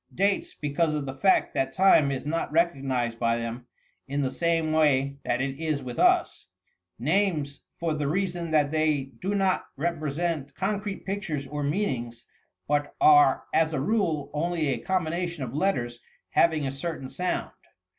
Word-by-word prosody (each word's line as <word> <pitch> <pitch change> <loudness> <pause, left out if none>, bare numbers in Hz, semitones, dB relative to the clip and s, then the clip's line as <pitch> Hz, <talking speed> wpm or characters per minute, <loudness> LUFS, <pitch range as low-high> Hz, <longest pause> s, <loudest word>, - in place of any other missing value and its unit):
Dates, 200 +1 0
because 150 +2 0
of 145 -2 -2
the 135 - -4
fact 190 +8 +2
that 135 0 -1
time 170 -4 +5
is 135 -1 -3
not 165 +1 -2
recognized 135 -8 0
by 115 -1 +2
them 120 +1 -5 0.4
in 140 +1 -1
the 130 - -1
same 165 -2 0
way 140 -3 +2
that 125 +1 0
it 135 +1 -3
is 155 -4 -1
with 125 -2 -6
ufl. - - +2 0.5
Names, 155 - 0 0.2
for 165 -2 -1
the 150 -2 -2
reason 175 0 -1
that 150 -2 +2
they 155 -4 0
do 195 +2 -1
not 190 -2 +1
represent 155 -1 -2
con 200 +2 -1
crete 200 -1 -6
pictures 190 -8 -3
or 145 +2 -5
meanings, 140 - -2 0.4
but 145 0 0
are 145 -3 +6
as 160 0 +2
a 150 - 0
rule 170 -4 0
only 160 0 0
a 125 -4 -1
com 185 +6 0
bination 170 -1 -3
of 120 -1 -6
letters 125 -8 -1 0.3
having 160 -3 +3
a 135 - -1
certain 140 -1 -5
sound. 180 +7 -3
150 Hz, 165 wpm, -26 LUFS, 135-170 Hz, 0.5 s, are